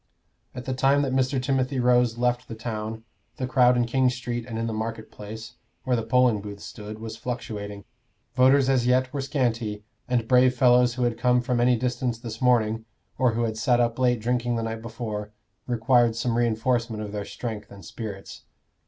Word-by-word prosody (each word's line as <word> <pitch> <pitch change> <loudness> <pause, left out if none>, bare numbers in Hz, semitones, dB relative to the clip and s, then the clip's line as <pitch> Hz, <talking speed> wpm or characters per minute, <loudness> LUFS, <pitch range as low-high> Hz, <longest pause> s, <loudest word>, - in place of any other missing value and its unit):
At 125 -1 -7
the 130 - -2
time 135 +2 +3
that 135 -2 -1
Mr. 130 0 +1
Timothy 130 0 0
Rose 125 -1 +3
left 125 0 0
the 115 - -7
town, 110 -1 -5 0.3
the 130 - -2
crowd 125 -1 +4
in 120 - +2
King 130 +2 +2
Street 120 -1 -4
and 115 -2 -5
in 115 - -1
the 115 - -2
market 110 0 -4
place, 110 +3 -9 0.3
where 125 - +1
the 115 - 0
polling 120 -1 +3
booths 100 0 -8
stood, 105 +1 -8
was 110 0 -7
fluctuating. 105 -5 -5 0.5
Voters 130 +1 +5
as 130 -3 +2
yet 130 +1 +2
were 140 - -2
scanty, 120 -6 -1 0.2
and 120 -3 0
brave 125 0 +5
fellows 125 -1 +4
who 125 - -1
had 120 -1 0
come 125 -1 +3
from 125 0 -1
any 125 0 +4
distance 125 0 -1
this 115 -1 -8
morning, 115 -3 +2 0.3
or 125 -3 +3
who 120 +1 0
had 110 -1 -2
sat 120 +1 +3
up 120 0 +1
late 125 -2 +2
drinking 120 +1 0
the 115 - -1
night 115 0 -4
before, 110 -2 -5 0.3
required 120 -1 +3
some 115 0 -1
reinforcement 115 -1 0
of 105 - -6
their 105 -1 -3
strength 110 -1 -6
and 100 -3 -12
spirits. 100 -4 -8
120 Hz, 195 wpm, -25 LUFS, 110-125 Hz, 0.5 s, Voters